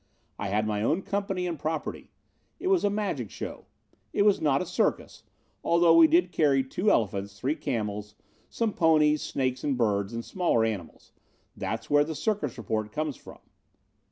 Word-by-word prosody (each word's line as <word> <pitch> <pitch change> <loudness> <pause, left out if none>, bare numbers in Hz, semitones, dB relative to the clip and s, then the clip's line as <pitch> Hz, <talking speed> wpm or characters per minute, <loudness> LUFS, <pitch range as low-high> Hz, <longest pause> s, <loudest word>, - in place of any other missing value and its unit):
I 100 - -2
had 105 +2 0
my 105 -1 -1
own 165 - +1
company 195 -2 -2
and 170 -4 -3
property. 155 +1 -4 0.5
It 370 - -2
was 380 -2 +3
a 205 - +3
magic 195 - -2
show. - - -7 0.5
It - - +3
was 205 -1 +3
not 140 -3 +3
a - - -2
circus, 180 - -1 0.4
although 170 -1 +4
we 165 -1 +8
did 175 +2 +3
carry 140 -5 +3
two 180 +10 0
elephants, 100 - 0
three 140 +4 0
camels, 105 -7 -4 0.3
some 225 -3 -1
ponies, 155 -5 +3
snakes, 130 -1 -2
and 140 -3 0
birds 100 -4 +1
and 115 0 -5
smaller 170 -11 +1
animals. 95 -8 -6 0.4
That's - - -4
where 145 0 +5
the 160 +1 -5
circus 200 - -2
report 110 -1 -3
came 155 +4 -2
from. 130 - -14
145 Hz, 170 wpm, -27 LUFS, 110-175 Hz, 0.5 s, we